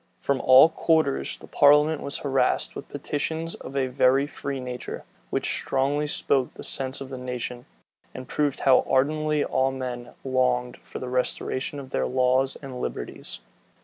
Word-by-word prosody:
From 140 -1 0
all 130 +4 +8
quarters 160 - +1
the - - -13
parliament 150 +2 +4
was 140 - -3
harassed 135 -1 +1
with - - -7
petitions 160 +3 -3
of 135 - -9
a 135 - +2
very 130 +2 +3
free 140 -1 -5
nature, 125 -1 -6 0.3
which - - 0
strongly 140 +3 0
spoke 135 -3 +1
the - - -9
sense 135 0 -3
of 135 - -7
the 130 -2 -6
nation, 125 -1 -5 0.4
and 130 -1 -9
proved 145 -1 -1
how 130 -2 +5
ardently 150 +3 +2
all 130 0 +1
men 125 -2 -6
longed 125 -2 0
for - - -10
the 130 - -5
restoration 130 +2 -2
of 135 -1 -10
their - - 0
laws 130 +1 +2
and 130 -2 -6
liberties. - - -5
130 Hz, 160 wpm, -25 LUFS, 125-145 Hz, 0.4 s, all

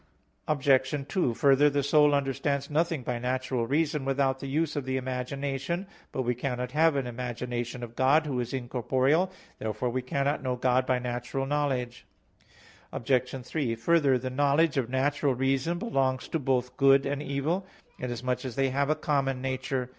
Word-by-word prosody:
Obj. 140 -1 +2
2: 150 -12 0
Further, 140 +3 +5
the 145 0 0
soul 150 +1 +4
understands 140 +1 -1
nothing 160 -2 0
by 120 0 -2
natural 125 -1 -1
reason 150 +1 0
without 135 0 +1
the 140 - -6
use 155 +3 0
of 145 -3 -2
the 130 0 -1
imagination. 135 +6 -3 0.3
But 130 - -2
we 125 0 +1
cannot 125 0 -3
have 160 0 +3
an 135 -2 0
imagination 120 0 -4
of 120 0 -8
God, 145 +4 +4
Who 135 -4 -2
is 120 -1 -3
incorporeal. 130 +7 +1 0.3
Therefore 110 +3 -2
we 130 +1 -1
cannot 140 +3 -1
know 130 -2 -1
God 125 +1 +1
by 130 - +2
natural 125 +2 -3
knowledge. 135 -4 -2 0.8
Obj. 125 +1 -1
3: 125 -5 -1
Further, 140 +2 +3
the 130 +1 -4
knowledge 145 +3 +2
of 130 -4 0
natural 140 +1 +1
reason 135 +6 0
belongs 135 - 0
to 165 - -1
both 125 -2 -1
good 135 0 +5
and 140 +1 -2
evil, 150 +7 -2 0.3
inasmuch 125 0 -2
as 130 -4 -5
they 135 -1 +1
have 140 +2 0
a 155 - +3
common 140 -4 0
nature. 130 -1 -2
135 Hz, 170 wpm, -28 LUFS, 125-145 Hz, 0.8 s, Further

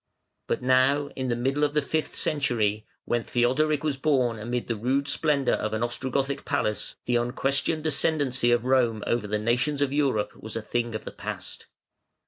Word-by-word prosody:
But - - -1
now, 130 +3 +3
in 130 -1 -2
the 120 - +1
middle 135 +5 0
of 145 0 +1
the 150 - +4
fifth 155 +2 -2
century, 110 -7 0 0.2
when 120 -1 0
Theodoric 145 +5 +1
was 150 -3 0
born 130 -6 +1
amid 120 +3 -2
the 115 - -2
rude 130 +6 0
splendour 145 -4 +1
of 110 0 -1
an 110 - -1
Ostrogothic 135 +3 -1
palace, 105 - -1
the 120 -1 +2
unquestioned 135 +6 0
ascendancy 140 -4 +1
of 120 0 +2
Rome 120 -5 +2
over 120 -3 0
the 105 +1 0
nations 125 +7 0
of 140 -1 +1
Europe 135 -8 +1
was 110 0 -8
a 115 - -2
thing 120 0 -2
of 110 - -5
the - - -5
past. - - -7
130 Hz, 180 wpm, -26 LUFS, 120-140 Hz, 0.2 s, the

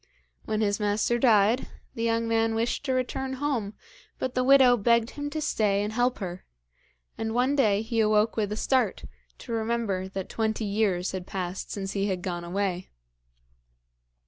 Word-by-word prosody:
When 215 0 -1
his 205 -1 +1
master 210 +3 +1
died, 225 0 +4 0.3
the 230 - -6
young 230 0 +1
man 225 0 +1
wished 230 +4 -1
to 265 - 0
return 265 +1 -2
home, 255 -7 -2 0.4
but 260 - -3
the 255 - +1
widow 260 -2 +6
begged 235 +1 +2
him 290 0 -5
to 310 - -4
stay 205 -8 +1
and 210 +1 -3
help 245 +2 +1
her; 180 -2 -6 0.8
and 225 0 -2
one 255 +3 +2
day 215 -6 +3
he 225 0 -2
awoke 215 0 +3
with 210 -2 -1
a 210 - -3
start, 250 -6 +1 0.3
to - - -10
remember 225 -4 -1
that 190 -1 -5
twenty 220 0 -1
years 200 -3 0
had 185 -1 -6
passed 185 -2 -4
since 195 -1 -4
he 200 0 -1
had 185 -3 -2
gone 175 -2 -3
away. 185 0 -2
220 Hz, 170 wpm, -27 LUFS, 200-240 Hz, 0.8 s, widow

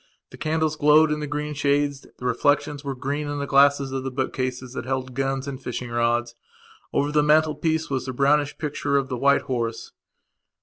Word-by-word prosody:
The - - -11
candles 155 0 0
glowed 150 +1 +5
in 150 - -1
the 150 - -4
green 150 +1 -3
shades; 145 -1 0
the 125 - -8
reflections 145 +4 +1
were 140 -1 -4
green 145 +3 -3
in 145 0 -3
the 140 - -2
glasses 140 0 +4
of 135 -1 -3
the 135 - -2
book 130 0 -3
cases 130 -1 -4
that - - -4
held 130 -1 -3
guns 135 +1 -2
and 135 -1 -6
fishing 125 -1 -5
rods. 120 0 0 0.6
Over 145 +1 0
the 150 0 +3
mantelpiece 155 +1 +2
was 130 -1 -2
the - - -2
brownish 145 +2 +2
picture 145 -2 -1
of 135 -1 -1
the 125 - -3
white 140 +3 +3
horse. 115 -3 -3
140 Hz, 200 wpm, -24 LUFS, 130-150 Hz, 0.6 s, glowed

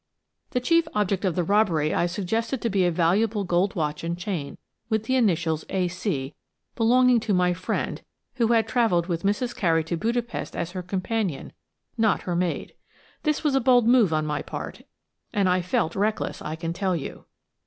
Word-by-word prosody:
The 250 - 0
chief 335 +6 +2
object 200 -2 0
of 180 -4 0
the 180 - +1
robbery 170 -6 +2
I 175 - +2
suggested 225 +8 -2
to 230 - 0
be 190 -2 +2
a 175 - +2
valuable 200 +6 +2
gold 180 +2 +1
watch 155 -3 -2
and 170 +1 -2
chain, 170 -6 -4 0.3
with 220 -1 0
initials 170 -11 +1
"A. 185 -2 0
C.," 170 -6 -3 0.4
belonging 250 +1 +4
to 215 -3 0
my 180 0 +3
friend, 185 +1 -3 0.4
who 235 -3 +3
had 225 -1 +3
travelled 220 -9 +2
with 170 -2 -2
Mrs. 225 +5 -1
Carey 165 -3 +2
to 165 +2 -3
Budapest 235 +5 -2
as 170 0 -3
her 185 0 -4
companion, 185 -1 -3 0.5
not 220 -2 +2
her 175 - -2
maid. 175 0 -2 0.5
This 305 0 0
was 300 -3 +2
a 270 - +3
bold 245 -1 +5
move 235 -7 +5
on 155 -1 +1
my 150 -1 -2
part, - - -7 0.5
and 200 -2 +2
I 180 0 +2
felt 170 -2 -1
reckless, 210 +2 -1
I 155 +1 -4
can 165 0 -4
tell 185 0 0
you. 150 - -6
190 Hz, 185 wpm, -25 LUFS, 170-225 Hz, 0.5 s, bold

